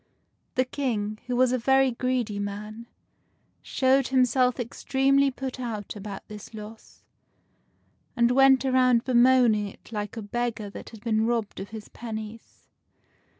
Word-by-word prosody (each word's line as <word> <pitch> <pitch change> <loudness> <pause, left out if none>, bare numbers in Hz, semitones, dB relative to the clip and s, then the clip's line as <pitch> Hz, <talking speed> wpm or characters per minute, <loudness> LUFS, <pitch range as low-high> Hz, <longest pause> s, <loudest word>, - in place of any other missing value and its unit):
The 255 - +2
King, 220 -6 -2
who 250 - -1
was 255 0 +3
a 255 - +1
very 265 +2 +3
greedy 240 -4 -1
man, 210 +3 -6 0.7
showed 265 0 +2
himself 255 -1 +2
extremely 270 +3 +1
put 265 0 -6
out 220 -5 -5
about 200 -1 -8
this 210 +1 -10
loss, 215 +1 -11 1.1
and 235 -1 +3
went 270 +1 +5
around 255 -2 +3
bemoaning 245 -4 +4
it 200 - -14
like 210 0 -4
a 225 - -4
beggar 225 -1 -3
that - - -9
had 220 -3 -13
been 220 -1 +1
robbed 230 -3 -2
of 195 - -7
his 220 -1 -9
pennies. 220 -1 -8
235 Hz, 140 wpm, -26 LUFS, 215-255 Hz, 1.1 s, went